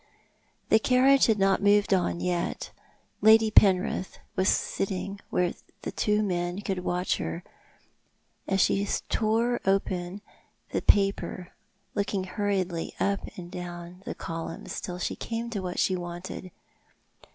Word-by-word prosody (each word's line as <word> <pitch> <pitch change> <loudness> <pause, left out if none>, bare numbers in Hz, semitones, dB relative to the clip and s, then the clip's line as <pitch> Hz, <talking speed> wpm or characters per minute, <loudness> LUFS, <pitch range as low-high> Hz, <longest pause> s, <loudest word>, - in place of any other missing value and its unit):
The 220 - +6
carriage 265 +3 +5
had 220 -2 +3
not 195 -1 +3
moved 205 0 +4
on 175 -2 +1
yet. 175 -1 -2 0.5
Lady 220 0 +6
Penrith 190 -2 +3 0.2
was 185 +1 +1
pitting 195 0 -3
where 180 -1 +1 0.3
the - - -3
two 210 0 +1
men 175 -1 -1
could 195 -3 -2
watch 180 0 0
her, 170 - -4 1.0
as 195 -1 +2
she 200 - +3 0.3
tore 230 +2 +1
open 190 -1 0 0.5
the - - 0
paper, 195 -2 +2 0.4
looking 200 -1 -1
hurriedly 190 -3 -2
up 200 0 +1 0.2
and 175 -1 -8
down 175 0 -7
the - - -5
columns 165 0 -5
till 180 - -5
she 180 - -2
came 230 +1 -4
to 210 - -2
what 180 -1 -4
she 185 - +2
wanted. 175 +1 -6
190 Hz, 130 wpm, -27 LUFS, 180-205 Hz, 1.0 s, The